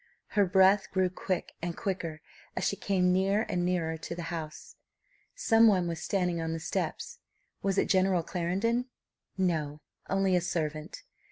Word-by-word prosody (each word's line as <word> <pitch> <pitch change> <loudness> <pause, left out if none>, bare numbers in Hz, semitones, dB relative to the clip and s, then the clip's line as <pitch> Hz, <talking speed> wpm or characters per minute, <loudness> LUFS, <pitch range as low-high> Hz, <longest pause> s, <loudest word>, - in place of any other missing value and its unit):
Her 205 -3 +3
breath 190 +2 +4
grew 185 -1 +1
quick 185 -1 -3
and 170 0 -3
quicker 165 -5 -3 0.3
as - - -2
she - - +1
came 180 -3 +1
near 195 +4 +2
and 175 - -1
nearer 170 -3 0
to 165 +1 -6
the 170 0 -5
house. 155 -2 -7 0.6
Some 230 - +5
one 185 -5 +3
was 165 -2 -4
standing 180 -3 0
on 165 0 -2
the 165 - -3
steps. - - -3 0.4
Was 195 0 0
it - - +3
General 185 -2 +3
Clarendon? 195 +9 0 0.5
No; 155 -5 -1 0.3
only 195 -1 +2
a 180 - +3
servant. 155 -1 -3
180 Hz, 160 wpm, -29 LUFS, 165-195 Hz, 0.6 s, Some